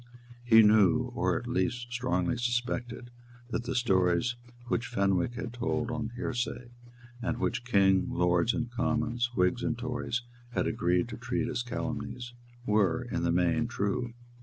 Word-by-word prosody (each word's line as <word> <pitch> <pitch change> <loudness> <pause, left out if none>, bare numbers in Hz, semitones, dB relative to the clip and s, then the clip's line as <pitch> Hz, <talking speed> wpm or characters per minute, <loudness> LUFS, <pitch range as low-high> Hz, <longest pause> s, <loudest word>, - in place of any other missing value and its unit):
He 115 -2 +7
knew, 105 -4 +4
or - - +1
at - - -6
least 120 +6 -1
strongly 120 -6 0
suspected, 120 0 -2 0.4
that 120 - -2
the 125 - -2
stories 95 -1 +2 0.3
which 120 0 -1
Fenwick 100 -1 +1
had 120 -1 -5
told 120 0 -1
on 115 -2 -3
hearsay, 120 0 -3 0.5
and 120 0 -1
which 120 -1 -1
King, 95 -5 +3
Lords 90 +4 +2
and 120 -1 -3
Commons, 120 0 0
Whigs 90 +6 +2
and 120 -1 -1
Tories, 125 0 -3 0.3
had - - +1
agreed 90 +4 +1
to - - -6
treat 120 0 -2
as 125 -2 -2
calumnies, 120 0 -4 0.3
were, 105 +2 +2
in - - -1
the 85 0 +1
main, 90 +7 +2
true. 120 +2 -2
120 Hz, 150 wpm, -30 LUFS, 100-120 Hz, 0.5 s, He